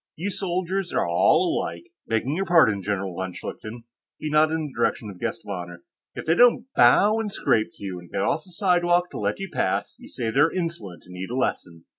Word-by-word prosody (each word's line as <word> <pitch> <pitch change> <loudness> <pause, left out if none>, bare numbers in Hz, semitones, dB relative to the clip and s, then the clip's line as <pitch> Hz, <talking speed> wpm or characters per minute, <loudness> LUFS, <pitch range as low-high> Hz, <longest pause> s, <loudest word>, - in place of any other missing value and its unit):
"You 190 +6 -3
soldiers 185 0 -2
are - - +1
all 85 0 +3
alike 85 +1 -7 0.2
begging 115 +6 0
your 195 +2 -2
pardon, 135 - +4
General 100 -1 -2
von 95 0 -4
Schlichten," 115 +5 -8 0.3
he 155 - -4
nodded 155 +1 +4
in 160 -1 -2
the 145 - -8
direction 105 -3 -1
of 90 - -13
the - - -11
guest - - -2
of - - -6
honor. 85 -2 -7 0.3
"If - - -6
they 165 - +3
don't 240 +4 +5
bow 205 - +5
and 215 -2 -3
scrape 110 - +1
to - - -14
you 95 -2 -5
and 85 -1 -14
get - - -1
off 165 +1 0
the 190 - -17
sidewalk 175 -1 +2
to - - -6
let - - -1
you 195 0 -5
pass, - - -1
you - - -13
say 115 -3 -3
they're 145 +7 +4
insolent 165 - -5
and 90 - -13
need 95 +2 -6
a 125 - -4
lesson. 85 -9 -3
140 Hz, 230 wpm, -24 LUFS, -, 0.3 s, don't